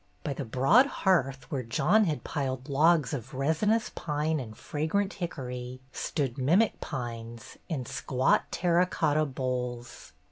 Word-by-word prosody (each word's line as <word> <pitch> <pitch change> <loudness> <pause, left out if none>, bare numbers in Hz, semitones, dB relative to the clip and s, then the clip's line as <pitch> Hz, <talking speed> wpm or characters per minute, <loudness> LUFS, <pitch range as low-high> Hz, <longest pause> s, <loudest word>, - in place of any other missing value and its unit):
By 145 - -2
the 135 - -5
broad 135 - +5
hearth, 135 - +1
where 135 -4 -1
John 155 - +3
had 155 -5 -2
piled 130 -2 -3
logs 155 0 +3
of 130 -1 -5
resinous 160 - +1
pine 155 0 -1
and 110 -4 -8
fragrant 175 +7 -1
hickory, 125 -7 -5
stood 135 -6 -2
mimic 175 +12 +3
pines 115 -4 -6
in 140 -7 -2
squat 130 +2 +1
terra 175 0 +2
cotta 155 -3 +1
bowls. 125 - -4
140 Hz, 135 wpm, -29 LUFS, 125-165 Hz, -, broad